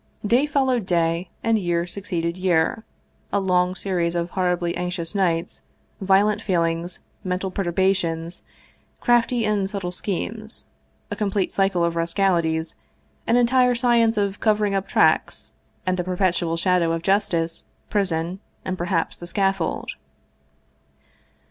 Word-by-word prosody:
Day 245 +7 +3
followed 260 -7 +1
day, 170 0 +1
and 225 -1 +2
year 175 -2 0
succeeded 175 -3 -3
year, 185 +3 +1 0.5
a - - +2
long 180 -1 +1
series 175 -3 -1
of 170 +1 -2
horribly 180 -2 0
anxious 180 -1 -3
nights, 170 -4 0 0.4
violent 200 +2 +3
feelings, 170 -3 -1 0.2
mental 185 0 -2
perturbations, 175 -2 0 0.6
crafty 240 -1 +2
and 205 -2 0
subtle 195 -4 -4
schemes, 215 +4 -4 0.5
a - - -1
complete 200 -3 -1
cycle 195 -3 +2
of 170 0 0
rascalities, 165 -2 0 0.5
an 230 - +3
entire 250 +1 +4
science 235 -2 +3
of 200 -1 0
covering 210 -2 +2
up 195 0 -1
tracks, - - +2 0.3
and 185 0 0
the 180 - -1
perpetual 180 -2 0
shadow 170 -1 +2
of 165 0 -3
justice, 170 -4 0 0.3
prison, 180 -3 0 0.3
and 185 0 -3
perhaps 175 -1 -1
the 175 - -9
scaffold. 195 -1 -1
185 Hz, 125 wpm, -23 LUFS, 170-205 Hz, 0.6 s, entire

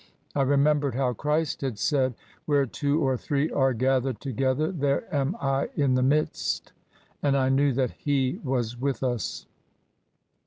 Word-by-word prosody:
I 140 - +2
remembered 140 -1 +2
how 130 -2 +1
Christ 150 +5 -1
had 130 -6 -2
said, 130 +3 +1 0.2
* - - -31
Where 145 -2 +3
two 145 +4 -1
or 130 -1 +1
three 145 +4 -1
are 135 -1 +2
gathered 130 0 0
together 135 - 0
^ 170 - -6
there 140 0 +1
am 140 +4 0
I 135 0 0
in 140 -3 +2
the 130 - +2
midst! 145 +4 0 0.5
And 140 -1 +2
I 130 -1 +2
knew 140 +1 +3
that 130 0 0
He 135 -3 -1
was 125 -4 -1
with 135 -2 -1
us. 120 -5 -2
135 Hz, 165 wpm, -26 LUFS, 130-145 Hz, 0.5 s, Where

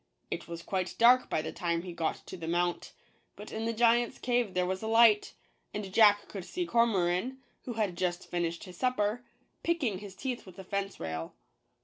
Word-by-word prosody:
It - - -4
was 170 0 -7
quite 185 -1 -2
dark 250 +2 +6
by 155 - 0
the - - -4
time 170 -1 -1
he 180 -2 -7
got 165 -1 -2
to - - -8
the 165 -3 -7
mount; 175 +1 -1 0.4
but 210 - -10
in 220 +1 -3
the 230 - +1
giant's 235 +1 +3
cave 240 -5 0
there 180 0 +2
was 185 +1 -2
a 220 - -3
light, 225 -2 +5 0.4
and 200 -2 -5
Jack 205 -2 +6
could 195 -3 -6
see 355 - -3
Cormoran, 230 - +2 0.3
who 245 - -4
had 210 -5 -1
just 175 -1 -1
finished 170 -1 -2
his 180 -1 -11
supper, 245 -2 0 0.4
picking 280 - 0
his 200 -2 -10
teeth 250 0 -4
with 185 - -13
a 190 - -8
fence 195 +1 -3
rail. 80 0 -5
200 Hz, 200 wpm, -30 LUFS, 175-230 Hz, 0.4 s, dark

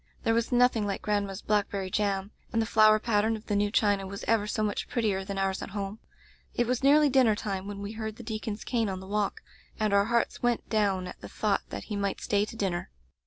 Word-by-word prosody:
There 225 - +2
was 230 +2 0
nothing 245 -4 +3
like 195 - -3
grandma's 205 -1 -1
blackberry 200 -2 0
jam, 200 -1 0 0.2
and 230 - +1
the 225 - +2
flower 215 -1 +6
pattern 220 0 +1
of 220 - -9
the 205 - -1
new 205 0 +2
china 205 -2 +2
was 200 +1 -7
ever 220 -2 +2
so 215 0 -1
much 210 -1 -2
prettier 210 -5 0
than 195 0 -5
ours 195 0 0
at - - -6
home. 200 +2 -4 0.6
It 240 - +2
was 250 +1 0
nearly 295 +2 +6
dinner 255 -5 +4
time 195 -2 -4
when 200 0 -6
we 200 - -4
heard 220 -1 -5
the 240 - -10
deacon's 215 -1 -4
cane 230 -4 0
on 190 -1 -4
the 190 - -10
walk, 205 +1 -1 0.4
and 215 -2 +1
our 200 0 +4
hearts 235 +1 0
went 240 -1 0
down 200 -4 +1
at 180 - -9
the - - -8
thought 210 -2 0
that - - -5
he 210 - -5
might 200 -1 -1
stay 205 0 +1
to 220 - -10
dinner. 190 -5 -2
210 Hz, 235 wpm, -28 LUFS, 200-225 Hz, 0.6 s, flower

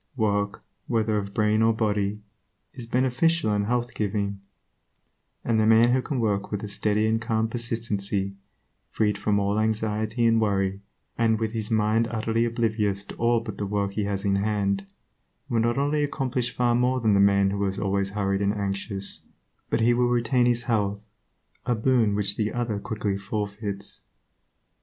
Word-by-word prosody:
Work, 100 -2 0 0.2
whether 110 -2 +1
of 100 -1 -6
brain 105 0 +2
or 115 0 +4
body, 105 -2 -1 0.5
is 120 -4 -8
beneficial 130 +3 +1
and 100 0 0
health 120 0 -1
giving, 100 -1 -2 1.1
and 115 -2 +2
the 110 - +3
man 115 +2 +6
who 130 - +2
can 135 0 -3
work 100 -3 -1
with 105 0 -3
a - - -3
steady 105 +1 0
and 110 +1 +1
calm 110 -1 0
persistency, 105 -4 -2 0.6
freed 105 -2 +1
from 105 0 +1
all 100 +1 0
anxiety 110 +1 0
and 115 -1 +4
worry, 100 -2 0 0.4
and 110 -1 +3
with 110 -1 -1
his 110 -2 -4
mind 110 +1 +2
utterly 115 0 0
oblivious 110 -4 0
to - - -10
all 115 0 +2
but 110 -4 -7
the 100 - -2
work 100 -1 -1
he 105 +1 -2
has 100 0 -3
in 100 0 +2
hand, 100 -1 0 0.6
will 115 - +1
not 120 +2 +1
only 145 +2 +1
accomplish 130 -3 -1
far 120 -1 +1
more 125 +2 +2
than 110 -3 +2
the 100 - +4
man 100 0 +4
who 100 0 -1
is 95 0 -3
always 100 -1 0
hurried 100 -1 -1
and 100 0 +1
anxious, 100 0 -3 0.5
but - - +1
he 120 +2 +4
will 120 0 +2
retain 120 +1 +2
his 120 0 +1
health, 105 -3 -1 0.6
a 120 - +2
boon 115 -2 +2
which 100 0 +2
the 110 -1 0
other 115 -4 -2
quickly 105 -2 -3
forfeits. 100 0 -5
110 Hz, 175 wpm, -25 LUFS, 100-115 Hz, 1.1 s, man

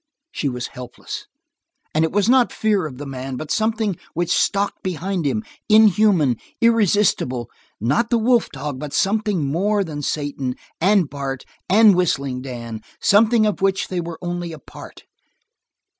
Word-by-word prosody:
She 145 - -2
was 125 -1 -4
helpless, 125 -1 -8 0.7
and 155 - +2
it 160 - 0
was 205 0 +1
not 255 0 +4
fear 205 -6 0
of 130 -4 -10
the 145 - -7
man, 135 -1 -5
but 155 +1 -6
of - - +3
something 220 -4 0 0.2
which 175 +1 -1
stalked 200 0 +1
behind 185 -2 -2
him, 215 +10 -1 0.3
inhuman, 210 - +5 0.2
irresistible; 205 - +2 0.3
not 135 - +1
the 235 - +3
wolf 235 +1 +2
dog, 140 -1 -5
but 150 -1 -6
something 205 -5 +1
more 200 +8 +1
than 150 -5 -6
Satan, 140 -3 -3 0.3
and 195 -2 +4
Bart, 135 -2 -5 0.2
and 210 +2 +7
Whistling 140 -7 0
Dan, 115 -4 -7 0.2
something 220 +2 +4
of 210 -2 -1
which 195 0 +1
they 180 -2 -2
were 170 -1 -6
only 175 -1 -3
a 160 - -8
part. - - -13
175 Hz, 160 wpm, -21 LUFS, 140-210 Hz, 0.7 s, and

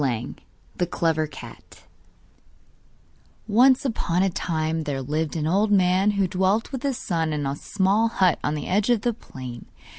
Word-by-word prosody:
] - - -33
The 175 - +2
Clever 160 -3 0
Cat - - -13 1.6
Once 250 +5 +4
upon 185 -7 0
a 195 - +1
time 160 -2 -2
there 140 -2 -2
lived 150 +4 -2
an 155 -2 -1
old 200 +6 +2
man 190 0 +3
who 195 -2 +2
dwelt 190 +5 0
with 265 -3 -4
his 275 -3 -1
son 165 -9 -1
in 145 -1 -2
a 135 +1 -2
small 200 +7 +1
hut 190 -6 +2
on 150 - 0
the 150 - -4
edge 205 +4 +1
of 235 -4 +3
the 240 +1 0
plain. 130 - -10
180 Hz, 170 wpm, -24 LUFS, 155-210 Hz, 1.6 s, Once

